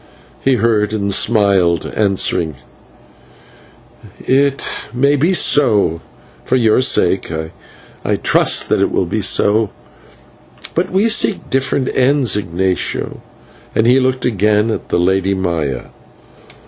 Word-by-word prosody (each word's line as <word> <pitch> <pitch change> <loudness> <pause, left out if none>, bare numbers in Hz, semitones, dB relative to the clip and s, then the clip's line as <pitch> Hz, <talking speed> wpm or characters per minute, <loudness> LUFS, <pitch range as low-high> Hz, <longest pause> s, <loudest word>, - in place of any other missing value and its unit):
He 135 -1 +2
heard 110 -3 0
and 100 -2 -2
smiled, 100 -6 +2
answering: 95 -6 0 1.6
"It 140 +1 0 0.3
may 140 +4 +1
be 155 +6 +1
so; 110 - +2 0.4
for 130 - -1
your 115 -1 +3
sake, 95 -8 +1 0.7
I - - 0
trust - - +1
that - - +1
it - - +2
will - - 0
be - - -3
so; 105 +1 +2 1.0
but 170 - -1
we 195 +4 +1
seek 215 -3 +1
different 135 0 -1
ends, 130 -2 +2
Ignatio," 95 -1 -2 0.5
and 110 - +2
he 125 +3 +4
looked 130 -1 -1
again 105 -1 +1
at - - -5
the - - 0
Lady 95 +2 +1
Maya. 80 -9 -3
110 Hz, 120 wpm, -15 LUFS, 95-130 Hz, 1.6 s, he